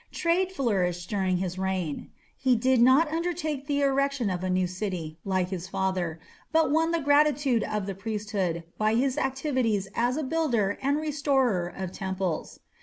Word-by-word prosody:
Trade 355 +2 +1
flourished 185 - -1
during 190 -3 +1
his 180 0 -3
reign. 185 -5 -2 0.3
He 255 -2 +2
did 255 +1 +3
not 260 +6 +6
undertake 320 -4 -2
the 285 -1 +1
erection 275 -5 +1
of 180 0 -3
a 185 - -1
new 185 0 +2
city, 180 -4 -4
like 185 -2 0
his 185 -1 -5
father, 185 -4 -2 0.3
but 320 -3 +3
won 325 +2 +3
the 335 0 +1
gratitude 290 -4 +3
of 210 -2 -2
the 195 - -3
priesthood 200 -4 -2 0.2
by 215 +1 +2
his 260 +2 +1
activities 260 -8 0
as 245 +3 +1
a 310 - -1
builder 260 -10 0
and 280 +2 +1
restorer 275 - +1
of 185 0 -6
temples. 190 -4 -3
225 Hz, 165 wpm, -27 LUFS, 185-280 Hz, 0.3 s, not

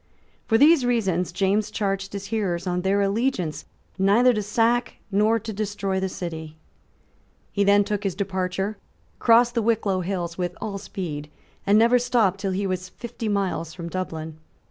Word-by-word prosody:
For 225 - +4
these 295 +2 +6
reasons 195 -8 0
James 200 +3 +1
charged 195 -1 -2
his 200 0 -5
hearers 185 -6 -1
on 180 -1 -1
their 195 +2 +2
allegiance 200 - -1 0.3
neither 220 +6 +5
to 215 - -1
sack 230 +4 +1 0.2
nor 210 +3 +3
to 225 0 -6
destroy 200 -2 -2
the 190 0 -1
city, 160 -3 -6 0.9
He 200 - +1
then 200 +1 +5
took 205 0 -3
his 195 -4 -1
departure, 190 +1 -2 0.4
crossed 235 +1 +5
the 235 - +1
Wicklow 215 -4 +1
hills 175 -2 -3
with 180 0 -2
all 200 -2 -4
speed, 155 -7 -6 0.4
and 205 +1 +5
never 235 +3 +5
stopped 235 -6 +2
till 195 0 -2
he 200 +2 -1
was 185 -1 -3
fifty 235 +1 -6
miles 190 -5 -1
from 170 -2 -6
Dublin. 160 -3 -5
200 Hz, 165 wpm, -24 LUFS, 185-220 Hz, 0.9 s, these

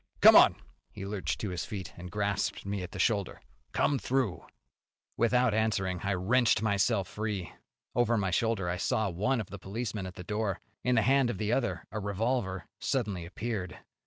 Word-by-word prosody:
Come - - +10
on!" - - +8 0.4
He 95 - -7
lurched 100 -1 -2
to 105 - -2
his 90 - -3
feet, 95 -7 -6
and 90 +1 -8
grasped 100 0 -1
me 100 0 -2
by 90 - -4
the - - -9
shoulder. 100 -5 0 0.3
"Come 140 - +2
through!" 120 -12 0 0.7
Without 125 0 +3
answering, 100 -4 0
I 100 0 0
wrenched 115 +6 +3
myself 100 -1 +2
free. 105 -6 -4 0.4
Over 120 -1 +2
my 95 -3 0
shoulder 110 -1 +1
I 90 +1 -1
saw 105 +1 0
one 110 +9 0
of 105 - -5
the 100 - -7
policemen 105 0 -4
at 90 - -9
the 90 - -8
door. 105 0 -2 0.2
In 125 0 +2
the 110 - +4
hand 135 +1 +4
of 120 - -3
the 105 +3 0
other 125 -1 -1
a 110 - -3
revolver 100 -1 -1
suddenly 100 -11 -1
appeared. 95 -2 -4
105 Hz, 185 wpm, -30 LUFS, 95-115 Hz, 0.7 s, Come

